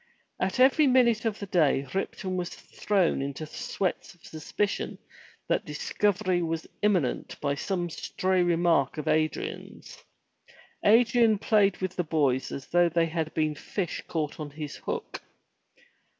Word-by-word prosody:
At 185 +5 -1
every 275 +3 +5
minute 240 -3 +3
of 220 -2 0
the 200 - -6
day 150 -7 +2
Ripton 190 0 -3
was 180 -1 -2
thrown 195 -8 -1
into 140 +3 -4
sweats 180 +4 -3
of 175 - -21
suspicion 180 +6 -3 0.5
that - - +1
discovery 205 - 0
was 165 -1 -2 0.2
imminent 185 -11 0
by 140 - 0
some 175 +4 -2
stray 185 +2 -1
remark 170 -5 +2
of 155 0 -5
Adrian*s. 155 - -2 0.8
Adrian 230 0 +5
played 200 -2 +3
with 185 -1 -4
the 180 - +1
boys 145 -5 0
as 135 - -6
though 175 0 +3
they 170 0 +2
had 160 -1 -2
been 155 -1 +1
fish 175 +4 -4
caught 155 -2 -3
on 150 -1 -5
his 150 0 -7
hook. - - -5
175 Hz, 140 wpm, -27 LUFS, 155-205 Hz, 0.8 s, every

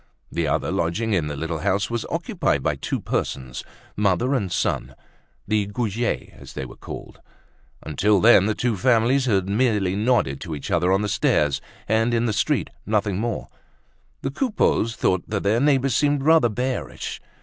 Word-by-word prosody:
The 85 -2 -1
other 70 - 0
lodging 105 +7 0
in 85 -6 +1
the 75 - -4
little 80 +2 -3
house 100 +7 0
was 120 -1 -2
occupied - - -1
by - - +1
two - - -3
persons, 65 -2 -3 0.3
mother 105 +6 +1
and 100 -9 -1
son, - - -1 0.5
the 105 -2 +1
Goujets 115 +2 -2
as - - -12
they - - -4
were - - -11
called. - - -9 0.6
Until 95 +7 +2
then 105 -2 +6
the 110 - 0
two 120 -3 0
families 125 +4 +3
had 100 -6 +1
merely 105 -3 +1
nodded 105 - +1
to 80 -3 -5
each 70 - -6
other 90 +2 +2
on 95 +2 +2
the - - 0
stairs 105 - +1 0.3
and 110 +2 +2
in 115 +1 +1
the 110 - 0
street, - - 0
nothing 105 -2 0
more; 115 0 -3 0.8
the 135 - -1
Coupeaus 170 - +1
thought 95 -1 +1
their 105 +1 +1
neighbors 135 -2 +2
seemed 145 -1 +2
rather 160 -5 +5
bearish. 125 +4 -4
105 Hz, 170 wpm, -23 LUFS, 95-120 Hz, 0.8 s, then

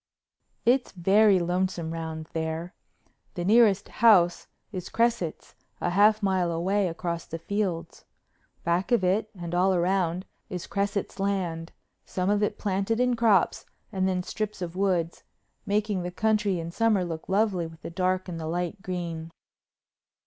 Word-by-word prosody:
It's 250 -1 +2
very 195 +3 +4
lonesome 175 -2 -1
round 160 -1 -5
there. 160 +2 -3 0.6
The 175 - -3
nearest 210 -2 +4
house 195 -7 +4 0.2
is 185 -3 -6
Cresset's, 230 -8 -1 0.3
a 175 - -1
half 210 +3 +4
mile 185 -3 +1
away 190 +4 +1
across 170 0 -4
the 165 - -5
fields. 170 -2 -3 0.6
Back 175 +7 0
of 235 -6 +3
it 200 +4 +1
and 170 0 -5
all 185 +1 +3
round 180 0 0 0.2
is 180 -4 -5
Cresset's 200 0 -2
land, 180 -4 -2 0.3
some 185 +1 -1
of 205 0 +2
it 210 - 0
planted 200 +3 -1
in 250 -1 +2
crops 220 -6 +2 0.2
and 190 -2 0
then 180 -1 0
strips 210 +2 -4
of 175 -1 -5
woods, 180 -4 0 0.5
making 205 -1 0
the 175 - -3
country 210 -1 +1
in 165 0 -5
summer 215 -2 +2
look 165 -2 -6
lovely 190 -4 +1
with 160 0 -15
the - - -6
dark 185 +2 0
and 170 -2 -5
the 160 - -4
light 175 +4 -3
green. 170 -3 -4
185 Hz, 150 wpm, -27 LUFS, 170-205 Hz, 0.6 s, very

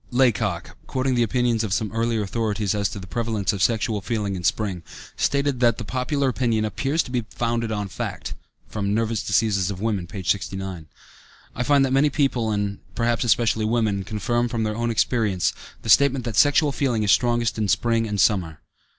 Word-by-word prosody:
Laycock, 110 -8 +1
quoting 130 0 0
the 120 - +2
opinions 120 0 +1
of 105 -4 -2
some 105 0 -1
earlier 115 -1 0
authorities 105 -1 -1
as 100 -1 0
to - - -7
the 95 - -7
prevalence 110 0 -1
of 100 - -4
sexual 110 -1 +1
feeling 105 -3 -2
in 90 - -6
spring, 95 0 0 0.3
stated 140 -2 0
that 120 -2 +3
that 115 - -5
popular 130 +4 -1
opinion 115 -3 0
"appears 135 +9 0
to - - -10
be 125 -2 -1
founded 115 -1 -2
on 105 -2 -2
fact" 95 - -5 0.4
(Nervous 110 +2 0
Diseases 100 -3 +1
of 100 -2 -5
Women, 100 -4 -1
p. 95 +1 -7
69). 95 -1 -2 0.7
I - - -3
find 140 +1 +4
that 130 - -1
many 140 +2 +4
people, 135 -6 0
and 100 -1 -2 0.2
perhaps 120 0 +1
especially 115 -1 +2
women, 110 -3 0
confirm 120 +4 -1
from 115 -2 -2
their 105 0 -1
own 120 +1 -1
experience, 110 -5 +1 0.3
the 115 - -5
statement 130 +4 +4
that 115 -3 -3
sexual 145 +4 +4
feeling 125 -6 0
is 100 - +3
strongest 120 -2 +2
in 105 - 0
spring 115 +4 +1
and 105 -1 -3
summer. 90 -6 +2
110 Hz, 185 wpm, -23 LUFS, 100-120 Hz, 0.7 s, find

